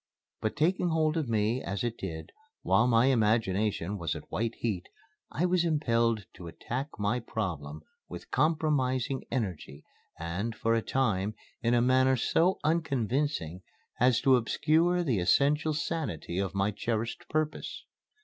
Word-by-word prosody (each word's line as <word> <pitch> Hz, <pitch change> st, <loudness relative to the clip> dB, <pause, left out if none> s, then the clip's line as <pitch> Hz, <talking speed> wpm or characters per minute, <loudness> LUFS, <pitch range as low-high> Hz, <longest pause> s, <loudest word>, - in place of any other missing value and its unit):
But, 110 Hz, -, -1 dB
taking 175 Hz, +4 st, +1 dB
hold 160 Hz, -1 st, +1 dB
of 155 Hz, -7 st, -1 dB
me, 110 Hz, +3 st, +1 dB
as 100 Hz, +3 st, -3 dB
it 120 Hz, -1 st, -1 dB
did, 80 Hz, -7 st, -6 dB, 0.3 s
while 120 Hz, -, +3 dB
my 115 Hz, 0 st, +4 dB
imagination 105 Hz, -5 st, +1 dB
was 85 Hz, -3 st, -2 dB
at -, -, -10 dB
white 115 Hz, 0 st, -1 dB
heat, 100 Hz, -6 st, -3 dB, 0.4 s
I 170 Hz, -, 0 dB
was 180 Hz, -1 st, +2 dB
impelled 115 Hz, -, +1 dB
to 90 Hz, -, -9 dB
attack 130 Hz, -, -4 dB
my 105 Hz, +4 st, 0 dB
problem 80 Hz, -10 st, -4 dB, 0.3 s
with -, -, -9 dB
compromising 135 Hz, -4 st, +1 dB
energy 90 Hz, -, -4 dB, 0.3 s
and, 90 Hz, +8 st, -3 dB
for 115 Hz, -, +1 dB
a 115 Hz, -, +2 dB
time, 110 Hz, -5 st, 0 dB, 0.3 s
in 120 Hz, 0 st, +2 dB
a 120 Hz, -, +3 dB
manner 130 Hz, +1 st, +4 dB
so 170 Hz, +9 st, +2 dB
unconvincing 140 Hz, -, 0 dB, 0.4 s
as 125 Hz, -1 st, +4 dB
to 130 Hz, -2 st, +5 dB
obscure 160 Hz, +8 st, +2 dB
the 125 Hz, -, +1 dB
essential 150 Hz, -, +2 dB
sanity 150 Hz, -, -3 dB
of 100 Hz, -1 st, -2 dB
my 100 Hz, +1 st, +1 dB
cherished 115 Hz, +2 st, -3 dB
purpose. 155 Hz, -1 st, -2 dB
120 Hz, 145 wpm, -29 LUFS, 105-150 Hz, 0.4 s, to